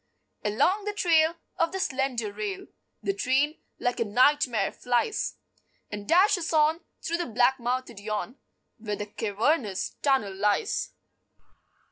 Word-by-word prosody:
Along 290 - +2
the 415 - -2
trail 330 -4 +3 0.2
Of 330 0 +1
the 385 - -3
slender 260 - -1
rail 390 - -4 0.4
The 395 - 0
train, 290 -4 +1 0.2
like 245 0 -1
a - - +3
nightmare, 245 -1 +3
flies 245 - -1 0.6
And 205 0 -6
dashes 360 -1 +4
on 310 +1 +4 0.2
Through 335 +1 -1
the 345 - -2
black 245 +3 +3
mouthed 245 -2 -2
yawn 215 +5 -4 0.4
Where 210 -2 -3
the 205 - -4
cavernous 210 - -1
tunnel 265 -9 +2
lies. 210 - 0
260 Hz, 130 wpm, -27 LUFS, 215-330 Hz, 0.6 s, dashes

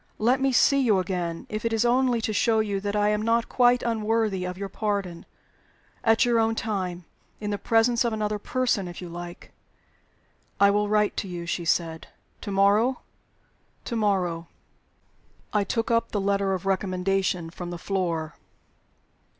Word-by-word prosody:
Let 250 +5 +2
me 270 0 +2
see 275 +3 +4
you 220 -6 +3
again, 175 -2 -3
if 215 0 -5
it 230 - 0
is 225 +1 +1
only 245 -1 +2
to 215 - -2
show 220 0 +2 0.2
that 205 +1 -3
I 210 0 +2
am 210 0 0
not 230 +1 +1
quite 245 -1 +3
unworthy 220 -4 0
of 180 0 -5
your 200 0 -4
pardon 195 -4 -3 0.8
at 225 +1 +4
your 235 -1 +3
own 225 0 +2
time; 185 -6 -3 0.3
in 210 -1 -3
the 205 - -2
presence 230 +3 +3
of 235 - 0
another 210 -1 -2
person, 240 -5 0
if 175 - -8
you 180 - -7
like." 175 0 -9 1.1
"I 200 0 +6
will 205 0 +1
write 210 0 +2
to - - -2
you," 175 -2 -6
she 170 0 -3
said. 165 -1 -1 0.3
"To 210 - -6
morrow?" 205 +6 +3 0.8
"To 235 - -3
morrow." 185 -6 0 1.1
I 210 -1 +2
took 225 +3 -2
up 230 0 +1
the 205 - -1
letter 200 -1 +1
of 185 - -7
recommendation 190 -2 0
from 175 +1 -7
the 175 - -5
floor. 170 -4 -2
205 Hz, 165 wpm, -25 LUFS, 180-225 Hz, 1.1 s, I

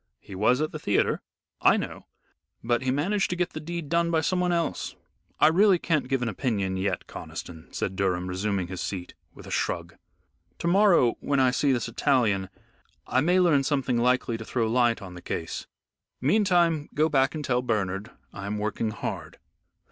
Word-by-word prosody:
"He - - -12
was 110 +8 +2
at 155 - -1
the 155 - -6
theatre." 105 - +1 0.4
"I - - +5
know, - - -6 0.6
but 120 +1 +1
he 130 - -1
managed 180 +10 +1
to 180 - -1
get 175 0 -1
the 155 - -6
deed 170 0 -5
done 170 +2 +1
by 165 -1 +2
someone 180 +2 +1
else. 170 -1 -1 0.4
I - - +6
really 185 +4 +5
can't 160 -5 0
give 135 -1 0
an - - -1
opinion 100 -4 -1
yet, 95 -1 -2
Conniston," 80 0 -9
said 95 - -3
Durham 90 -2 0
resuming 95 +1 -1
his 90 +1 -6
seat, 90 -3 -5 0.2
with - - -12
a - - -9
shrug; - - -2 0.6
"to - - -6
morrow, 175 - +4
when 140 -1 0
I 130 -1 +4
see 140 +2 +2
this 120 -2 0
Italian, 115 -6 +1 0.6
I 130 - +2
may 180 +5 +3
learn 165 -6 +4
something 135 -4 0
likely 125 -1 +1
to - - -5
throw 115 -1 0
light 120 -1 +2
on 95 -2 -9
the 90 - -10
case. 80 -1 -4 0.5
Meantime 170 - +2
go 155 +1 +3
back 135 -1 +2
and 150 -2 -4
tell 125 -1 +1
Bernard 105 -3 -2 0.2
I 100 0 -6
am 105 +1 -2
working 105 +1 -1
hard." 110 - -5
125 Hz, 185 wpm, -26 LUFS, 100-160 Hz, 0.6 s, I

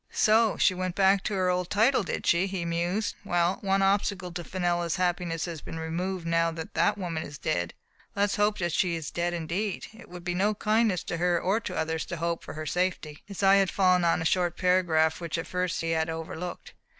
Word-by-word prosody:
"So 220 0 +3
she 185 - +4
went 185 -1 -3
back 195 0 +4
to 210 - -1
her 185 -1 +2
old 180 -1 -1
title, 230 +6 +3
did 190 - -4
she?" 175 +3 +3
he 190 -3 -3
mused. 175 +5 -1
"Well, 175 -1 +1
one 195 -1 +2
obstacle 195 -2 +1
to 175 0 -5
Fenella's 175 -2 -1
happiness 175 -3 -1
has 165 -4 -6
been 165 - -7
removed 170 +3 -3
now 165 0 +2
that 160 -1 -7
that 170 +4 +2
woman 170 -5 -3
is 150 -2 -8
dead. 85 -7 -2 0.4
Let 200 - +2
us 205 - +1
hope 205 0 +2
that 175 -1 -1
she 175 -1 +1
is 160 -3 -5
dead 175 0 -1
indeed. 175 +5 -3
It 225 - -14
would 175 0 -9
be 175 0 -2
no 205 +4 +1
kindness 215 -3 +1
to 170 - -4
her 175 0 +2
or 195 +6 +1
to 185 -5 -6
others 160 0 -1
to 170 - -4
hope 170 0 -2
for - - -8
her 155 0 -5
safety." 170 -3 -2
His 200 -1 -6
eye 195 0 +7
had 195 -2 +3
fallen 185 -2 +3
on 165 -1 +2
a - - -6
short 175 0 +1
paragraph, 170 -3 +2
which 170 -1 -3
at 165 - -3
first 180 -1 -2
he 165 0 -1
had 160 0 0
overlooked. 165 +2 -6
180 Hz, 225 wpm, -27 LUFS, 165-195 Hz, 0.4 s, eye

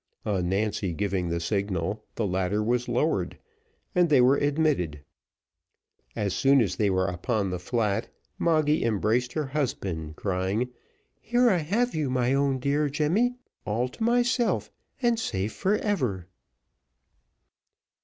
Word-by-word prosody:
On 95 -4 0
Nancy 100 -1 -1
giving 95 -1 -1
the 85 0 -1
signal, 100 +2 -2
the 115 - -1
ladder 95 +2 0
was 120 +2 0
lowered, 150 +7 0 0.6
and 180 -3 +3
they 145 -3 +5
were 125 +2 +6
admitted. 145 - 0 1.1
As 100 -3 -1
soon 135 0 +4
as 100 -6 +1
they 105 -2 +2
were 95 -1 +1
upon 95 +2 -1
the 90 - -3
flat, 110 +2 -1 0.3
Moggy 155 -2 +2
embraced 115 +3 +1
her 155 -2 -1
husband, 95 - -3
crying, 95 +6 -1 0.5
"Here 240 +1 +3
I 185 - +3
have 210 +10 0
you, 155 -4 -1
my 125 0 +1
own 140 -1 +2
dear 145 +3 +1
Jemmy, 175 - +1 0.3
all 115 +4 -1
to 220 - -6
myself, 240 0 +1 0.3
and 235 -1 +3
safe 100 - -2
for 200 +2 +1
ever." 125 - -1
120 Hz, 135 wpm, -27 LUFS, 95-150 Hz, 1.1 s, were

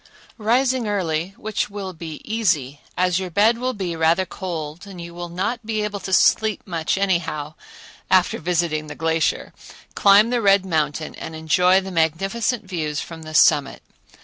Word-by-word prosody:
Rising 245 +2 +1
early,—which 195 +2 -2
will 200 -2 -6
be 160 -2 -8
easy, 170 - 0 0.2
as 180 0 +2
your 185 -1 -4
bed 215 +6 +3
will 255 0 -2
be 185 -4 -3
rather 165 +3 +2
cold 170 -2 -6
and 190 -3 -10
you 170 0 -8
will 175 0 -6
not 210 +7 -3
be 215 -1 -2
able 205 -1 -3
to 190 - -6
sleep 215 +2 +3
much 165 -1 -1
anyhow,—after 175 0 -1
visiting 165 -2 -1
the 150 - -8
glacier, 160 0 -1 0.4
climb 205 +3 +5
the 245 -1 +1
Red 195 -2 +4
Mountain 155 -3 -1
and 160 - -8
enjoy 180 +4 +3
the 190 0 -7
magnificent 195 - 0
views 155 -5 -3
from 165 -1 -8
the 155 0 -8
summit. 145 -3 +4
180 Hz, 155 wpm, -22 LUFS, 160-205 Hz, 0.4 s, climb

